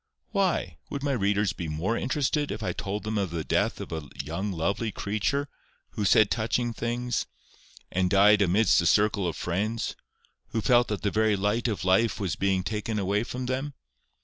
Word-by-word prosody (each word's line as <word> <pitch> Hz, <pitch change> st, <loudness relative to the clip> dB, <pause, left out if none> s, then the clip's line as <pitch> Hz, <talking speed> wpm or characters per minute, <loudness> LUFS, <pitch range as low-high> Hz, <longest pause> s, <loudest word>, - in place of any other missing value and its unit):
Why? 195 Hz, -4 st, 0 dB
Would 140 Hz, -1 st, -4 dB
my 145 Hz, -, +1 dB
readers 105 Hz, -4 st, +1 dB
be 85 Hz, -5 st, -5 dB
more 80 Hz, +9 st, -1 dB
interested 145 Hz, +3 st, 0 dB
if 110 Hz, -, -5 dB
I -, -, -1 dB
told 100 Hz, +2 st, -4 dB
them 110 Hz, -1 st, -1 dB
of 95 Hz, -3 st, -1 dB
the 85 Hz, -1 st, -3 dB
death -, -, 0 dB
of -, -, -7 dB
a 80 Hz, -4 st, -5 dB
young 85 Hz, +8 st, -3 dB
lovely 100 Hz, +6 st, -1 dB
creature, 110 Hz, +9 st, -1 dB, 0.4 s
who 105 Hz, -, -2 dB
said 105 Hz, +1 st, +5 dB
touching 115 Hz, +1 st, 0 dB
things, 120 Hz, +1 st, -2 dB, 0.6 s
and 90 Hz, 0 st, +1 dB
died 105 Hz, +2 st, +5 dB
amidst 100 Hz, +2 st, +4 dB
a 85 Hz, -, +1 dB
circle 105 Hz, 0 st, +3 dB
of 85 Hz, -, -3 dB
friends, 105 Hz, +6 st, -2 dB, 0.5 s
who 115 Hz, -, -2 dB
felt 120 Hz, +1 st, +4 dB
that 105 Hz, -2 st, -3 dB
the 100 Hz, -, +1 dB
very 110 Hz, -1 st, +2 dB
light 105 Hz, +5 st, 0 dB
of 100 Hz, -6 st, -2 dB
life 95 Hz, +5 st, +3 dB
was 95 Hz, -4 st, -1 dB
being 95 Hz, -1 st, +1 dB
taken 105 Hz, +2 st, -3 dB
away 100 Hz, +2 st, +1 dB
from 125 Hz, +1 st, -5 dB
them? 130 Hz, +3 st, -3 dB
105 Hz, 185 wpm, -27 LUFS, 95-115 Hz, 0.6 s, said